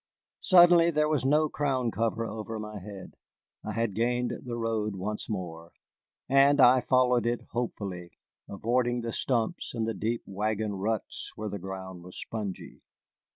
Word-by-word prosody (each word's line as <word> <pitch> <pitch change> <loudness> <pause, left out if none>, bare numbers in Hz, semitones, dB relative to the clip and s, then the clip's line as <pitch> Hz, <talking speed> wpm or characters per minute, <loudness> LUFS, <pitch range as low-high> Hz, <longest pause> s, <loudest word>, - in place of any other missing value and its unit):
Suddenly 175 -2 +6
there 150 -2 +2
was 150 -3 +1
no 150 +3 +4
crown 135 -5 -1
cover 115 +1 -1
over 110 0 -5
my 105 -1 -6
head. 100 0 -10 0.5
I - - -4
had 115 -3 -1
gained 120 +3 0
the 120 -2 -4
road 110 -3 -1
once 105 +3 -4
more, 85 -5 -5 0.5
and 140 +1 +5
I 130 0 +7
followed 125 -2 +3
it 120 0 0
hopefully, 95 -7 -4 0.4
avoiding 120 +4 0
the 115 -1 -4
stumps 120 +3 -1
and 110 -1 -1
the 115 - -1
deep 115 +4 -2
wagon 105 +1 -2
ruts 105 +2 -3
where 110 0 -4
the 100 - -5
ground 95 -1 -7
was 90 +1 -8
spongy. 105 -4 -6
115 Hz, 155 wpm, -28 LUFS, 100-125 Hz, 0.5 s, I